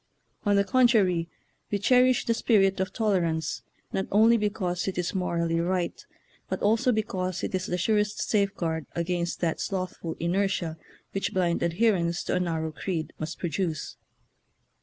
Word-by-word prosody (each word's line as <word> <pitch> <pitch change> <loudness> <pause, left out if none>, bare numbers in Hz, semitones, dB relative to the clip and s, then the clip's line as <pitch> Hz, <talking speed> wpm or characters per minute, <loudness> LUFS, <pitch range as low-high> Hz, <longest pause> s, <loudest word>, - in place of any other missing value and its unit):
On 205 - +4
the 200 - +4
contrary, 200 -7 +3 0.4
we 205 - 0
cherish 250 +4 +4
the 230 - +2
spirit 195 -5 +3
of 190 +1 -1
tolerance 170 -7 0 0.3
not 190 - -1
only 220 +3 +6
because 200 -5 -1
it 190 - -3
is 180 -1 -1
morally 170 -3 0
right, 175 0 -1 0.5
but - - -2
also 225 +4 +3
because 185 -5 -2
it - - -3
is 185 0 -1
the 180 - -1
surest 210 +2 +1
safeguard 175 -6 0
against 170 0 -2
that 165 -2 0
slothful 185 -3 -3
inertia 175 -2 0 0.4
which 195 - -2
blind 175 -2 +1
adherence 170 -1 +1
to - - -2
a - - +2
narrow 160 -3 -1
creed 160 0 -4
must 155 +2 -4
produce. 165 -1 -3
185 Hz, 150 wpm, -27 LUFS, 170-205 Hz, 0.5 s, only